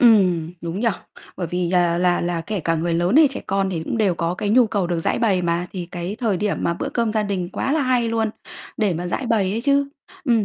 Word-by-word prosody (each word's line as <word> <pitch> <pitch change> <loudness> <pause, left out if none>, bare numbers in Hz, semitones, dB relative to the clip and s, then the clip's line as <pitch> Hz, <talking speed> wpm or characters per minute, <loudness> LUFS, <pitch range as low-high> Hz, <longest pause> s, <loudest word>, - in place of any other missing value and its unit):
Ừm, 185 -9 +4
đúng 170 +3 -4
nhỉ. 235 - +3 0.5
Bởi 180 - -3
vì 175 +1 -1
là 175 -2 +2
là 180 0 +2
là 175 -1 -1
kể 195 +4 -3
cả 165 +1 0
người 165 +1 -1
lớn 175 +8 +2
hay 310 -1 +7
trẻ 265 - -3
con 195 0 0
thì 165 -3 -3
cũng 195 - -3
đều 200 -5 +2
có 170 +1 -1
cái 200 - -3
nhu 240 +3 +5
cầu 200 -4 -1
được 170 -1 -1
giãi - - 0
bày 200 -6 +2
mà, 170 +1 0
thì 180 -3 -5
cái 175 +4 -4
thời 220 -6 +1
điểm 205 +2 -1
mà 170 - 0
bữa - - -3
cơm 230 -2 -1
gia 215 -1 +1
đình 195 -4 -2
quá 270 - -1
là 315 - +2
hay 250 -3 +2
luôn 225 -1 0 0.5
để 205 -6 +1
mà 175 +2 -3
giãi 245 +9 -2
bày 210 -5 +2
ấy 220 +3 -1
chứ. 280 +1 +2 0.4
Ừm, 230 -6 +3
190 Hz, 265 wpm, -22 LUFS, 175-225 Hz, 0.5 s, hay